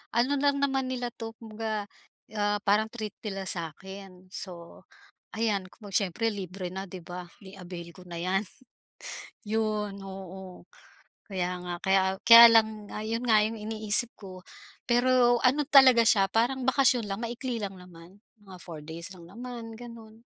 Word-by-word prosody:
Ano 265 +4 +2
lang 280 0 +2
naman 270 -2 +1
nila 245 -2 -3
'to 225 -1 -8
kumbaga, 220 -1 -4 0.5
ah, 205 -1 -1
parang 210 +2 +3
treat 220 -3 -6
nila 195 -3 -5
sa 170 -4 -4
akin, 190 -1 -12
so 175 -4 -9 0.5
ayan, 210 -4 0
kumbaga 205 0 -2
siyempre 225 +6 -1
libre 185 -2 -6
na 190 +1 -5
'di 180 -2 -9
ba, 180 0 -8 0.2
i-avail 180 -3 -9
ko 180 +2 -15
na 175 - -7
'yan. 190 +2 0 1.0
Yun, 215 -2 -1
oo, 190 -1 -9 0.6
kaya 180 -3 -2
nga, 175 0 -4
kaya 190 0 +3 0.3
kaya 230 0 +12
lang 220 -2 +2
nga, - - -4
ah, 215 - -5
yun 230 +2 -2
nga 220 -3 +5
yung 225 +1 -3
iniisip 215 +1 0
ko 185 -2 -10 0.5
pero 245 0 +4
ano 280 +3 +3
talaga 265 -4 +8
siya 215 -3 +5
parang 250 +3 +1
bakasyon 255 -2 +3
lang 200 +1 -4
maikli 240 0 -4
lang 195 -2 -5
naman, 180 0 -14 0.2
mga 190 -2 -13
4 160 -4 -8
days 165 +4 -8
lang 170 -2 -13
naman 230 +2 -8
ganun. 230 -1 -12
210 Hz, 160 wpm, -28 LUFS, 185-230 Hz, 1.0 s, kaya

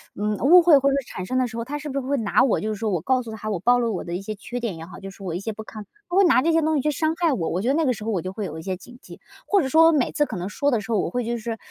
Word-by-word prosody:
嗯， 210 0 -1
误 345 - +7
会 330 -4 +6
或 275 0 +2
者 275 - +1
产 185 - -7
生 255 +7 -2
的 255 - +2
时 230 -1 -8
候， 230 - -3
他 290 +4 -4
是 295 +1 -7
不 275 0 -2
是 260 - -7
会 285 - +1
拿 220 -6 +2
我 240 - +1
就 215 - -2
是 215 - -2
说， 220 +1 -2
我 175 -4 -1
告 255 +6 +1
诉 235 - -9
他 215 0 -6
我 190 -5 -2
暴 245 +6 +4
露 240 -1 0
了 - - -1
我 - - -4
的 170 - -4
一 185 - -4
些 215 +2 -5
缺 240 +4 -7
点 210 -8 -3
也 165 - -8
好， 185 - -11
就 195 - -7
是 - - -17
说 195 - -8
我 165 - -3
的 - - -2
一 - - -7
些 220 - -3
不 220 +1 -9
堪， 215 -1 -9 0.2
他 350 - -4
会 395 - +6
拿 335 -7 +5
这 330 +4 +1
些 325 - +3
东 315 0 +1
西 275 - +1
去 300 - +1
伤 315 +2 0
害 335 -5 +2
我， 165 -9 -2
我 180 - -1
觉 235 - -2
得 270 - +3
那 320 +1 +1
个 260 - +2
时 220 -3 -5
候 - - -2
我 180 -5 -1
就 185 - -5
会 205 +1 -5
有 160 - -6
一 - - -7
些 185 +1 -4
警 245 +6 -14
戒。 - - -13 0.3
或 400 -3 +3
者 265 - -1
说 320 +4 +5
我 - - +6
每 290 -6 +1
次 295 - +2
可 220 -9 -6
能 180 +2 -4
说 285 +7 0
的 235 - +2
时 225 +2 -4
候， 210 - +2
我 - - -1
会 245 -1 -2
就 235 +1 -2
是 225 0 -5
235 Hz, 445 characters per minute, -23 LUFS, 205-280 Hz, 0.3 s, 误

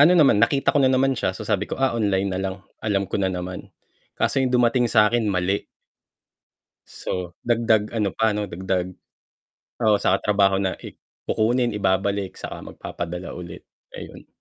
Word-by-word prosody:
ano, 170 +5 +7
naman 140 -10 +5
nakita 140 +4 +3
ko 145 - +3
na 130 - +5
naman 130 +1 +3
siya. 95 -7 -2
So, 110 - -7
sabi 105 -1 -1
ko, - - -4
ah, 135 -2 +1
online 100 -4 0
nalang, 95 +1 -4 0.2
alam 100 -3 0
ko 95 +1 -3
na 95 - +2
naman, 90 0 -5 0.5
kaso - - +1
yung 130 - +2
dumating 120 0 +3
sakin 110 0 +3
mali. 95 +1 0 1.3
So, 90 -2 -5
dagdag 115 -3 +2
ano 105 -6 -1
pa, 110 +4 +2
'no, 105 0 -2
dagdag 95 0 -3 0.9
oo, 105 -1 +5
sa 95 - +1
katrabaho 100 -2 +2
na, 95 -1 -1
e - - -12 0.2
kukunin, 120 +2 +1
ibabalik 100 -1 0
saka - - -7
magpapadala 90 +1 -6
ulit. 90 -1 -9 0.3
Ayun. - - -10
105 Hz, 160 wpm, -23 LUFS, 95-115 Hz, 1.3 s, ano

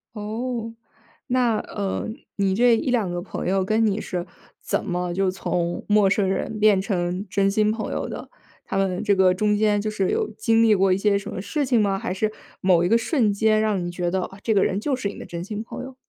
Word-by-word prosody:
哦， 225 +2 -4 0.5
那， 245 -3 +2
呃， 200 -2 -3 0.3
你 195 -2 +1
这 240 +2 +5
一 270 - -2
两 225 -7 +1
个 175 0 -3
朋 185 - -5
友 190 0 +1
跟 220 +3 +2
你 210 -1 +1
是 180 -4 -4 0.4
怎 - - -1
么 180 -2 -2
就 190 +1 +1
从 175 -2 -2
陌 205 -2 +5
生 200 0 +2
人 195 +3 -2
变 210 -2 +4
成 185 -1 -2
真 195 +1 +2
心 210 +1 +2
朋 215 0 -3
友 - - -2
的？ - - -7 0.3
他 - - -4
们 195 0 0
这 205 -2 +3
个 190 -1 +4
中 210 +2 +1
间 210 -1 +2
就 215 +1 -2
是 195 -3 0
有 - - 0
经 225 +1 +3
历 225 -1 +5
过 195 -1 +3
一 - - +1
些 200 0 +2
什 - - -8
么 185 - -5
事 290 +8 -1
情 250 -3 +2
吗， 195 -2 +1
还 - - -3
是 215 +3 -1 0.3
某 185 -3 +4
一 - - +2
个 230 - +4
瞬 230 -2 +1
间 215 +1 +3
让 210 -4 0
你 175 - -4
觉 175 0 -2
得， 190 +1 0
哦， 190 +2 -7
这 220 - +1
个 195 - +4
人 190 - 0
就 270 +5 0
是 230 -6 -3
你 - - -9
的 - - -8
真 170 0 -6
心 210 +3 -5
朋 230 - -7
友？ 265 0 -9
205 Hz, 255 characters per minute, -23 LUFS, 190-220 Hz, 0.5 s, 这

